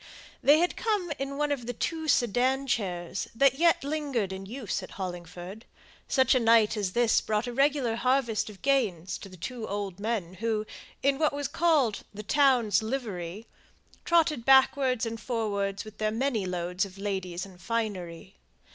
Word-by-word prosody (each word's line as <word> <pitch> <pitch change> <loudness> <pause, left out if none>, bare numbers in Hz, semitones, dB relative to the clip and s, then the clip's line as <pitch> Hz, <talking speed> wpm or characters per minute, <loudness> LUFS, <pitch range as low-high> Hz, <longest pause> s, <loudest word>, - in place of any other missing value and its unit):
They 290 +2 +6
had 350 +2 +1
come 415 -7 -1
in 275 +1 -4
one 295 0 0
of 250 -5 -2
the 245 - -2
two 320 +5 -2
sedan 255 +2 +2
chairs 185 -7 -2
that 270 +3 +3
yet 335 -3 +4
lingered 280 -9 -2
in 190 0 -7
use 235 -3 -4
at 185 - -9
Hollingford; 180 +2 -7 0.4
such 260 -1 +3
a 255 - +4
night 225 -2 +4
as 200 -4 -2
this 240 -1 +3
brought 215 +1 -1
a 245 - -5
regular 275 -3 +2
harvest 235 -4 +1
of 200 -2 -14
gains 210 -11 0
to 195 - -10
the 185 - -13
two 230 +5 -5
old 200 -2 -4
men 205 -5 -2
who, 220 -1 -1 0.4
in 275 0 +2
what 305 -2 +2
was 285 -1 -2
called 295 -10 +2
the 210 - -6
"town's 245 -4 +3
livery," 215 -5 -4 0.6
trotted 315 -7 +2
backwards 265 -2 +4
and 230 0 -5
forwards 200 -5 -2
with 215 -1 -12
their 215 0 +1
many 225 -3 -1
loads 180 +1 -1
of 195 -1 -7
ladies 190 -3 -3
and 185 -2 -15
finery. 190 -4 -4
225 Hz, 170 wpm, -28 LUFS, 195-270 Hz, 0.6 s, They